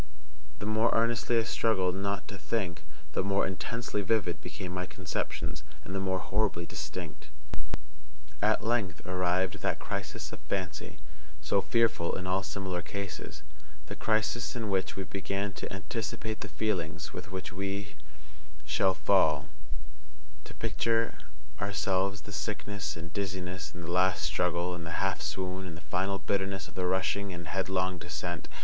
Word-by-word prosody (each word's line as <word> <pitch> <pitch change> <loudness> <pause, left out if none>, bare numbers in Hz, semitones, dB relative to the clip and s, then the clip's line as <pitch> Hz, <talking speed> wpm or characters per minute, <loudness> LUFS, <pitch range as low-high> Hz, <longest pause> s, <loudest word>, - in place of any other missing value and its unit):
The 105 - -4
more 110 +2 +4
earnestly 115 +1 +3
I 115 - +5
struggled 95 -6 +3
_not 100 +1 0
to 105 - -6
think,_the 80 -8 -2
more 100 0 +3
intensely 105 +5 -1
vivid 95 -3 +2
became 90 -1 -5
my 90 0 -1
conceptions, 85 -4 -2 0.2
and 95 - -6
the 95 - +1
more 95 -1 +2
horribly 95 -2 +1
distinct. 75 -1 -5 1.1
At 105 +1 +4
length 110 -8 +1
arrived 95 +1 +2
that - - +2
crisis - - -3
of - - -5
fancy, 90 -6 -2 0.4
so 75 +6 +3
fearful 115 -8 +3
in 90 - -4
all 95 +1 +3
similar 95 -2 -2
cases, 90 -3 -5 0.4
the 100 - -5
crisis 110 +3 +2
in 110 -4 -1
which 95 -1 +2
we 95 - -1
began 100 +1 -1
to - - -4
anticipate 110 +4 -2
the - - -3
feelings 90 -8 -1
with - - -6
which 95 -1 -4
we 100 0 -2 0.7
_shall_fall—to 75 -3 +1
picture 115 0 +2 0.5
to - - -1
ourselves 100 0 +2
the 105 - -9
sickness, 100 -2 -2
and 85 -1 -7
dizziness, 90 -4 -2
and 85 +1 -7
the 85 - -3
last 90 +1 +4
struggle, 90 0 +2
and 85 -1 -4
the 85 +1 -2
half 95 -4 +2
swoon, 90 +4 -2
and 85 -2 -6
the - - -9
final 95 +2 +3
bitterness 95 -1 0
of - - -13
the 90 -1 +1
rushing 95 +2 +2
and 85 -1 -5
headlong 95 -1 +1
descent. 85 +1 -3
95 Hz, 150 wpm, -32 LUFS, 85-100 Hz, 1.1 s, I